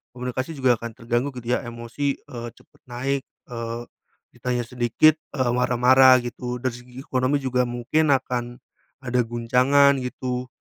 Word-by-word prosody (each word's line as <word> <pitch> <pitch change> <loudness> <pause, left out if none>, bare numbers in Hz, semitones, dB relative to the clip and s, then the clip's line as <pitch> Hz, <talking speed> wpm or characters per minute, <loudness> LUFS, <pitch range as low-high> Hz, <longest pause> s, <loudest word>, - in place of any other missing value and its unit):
komunikasi 125 +5 -4
juga 130 -2 +4
akan 115 - -4
terganggu 120 +4 -1
gitu 120 0 -2
ya, - - 0
emosi, 120 +4 -3
eee, 120 -4 -8
cepet - - -24
naik, 135 +3 -2 0.3
eee, 115 0 -4 0.5
ditanya 125 -1 -2
sedikit, 125 +5 +3 0.2
eee, 130 -3 +1
marah-marah 125 +1 +5
gitu. 125 0 -5
Dari 130 - +1
segi 125 +1 -13
ekonomi 130 +1 +1
juga 125 -1 +1
mungkin 120 +6 0
akan 125 -3 0 0.5
ada 125 -1 0
guncangan 125 +4 +3
gitu, 125 0 -4
125 Hz, 140 wpm, -23 LUFS, 120-130 Hz, 0.5 s, marah-marah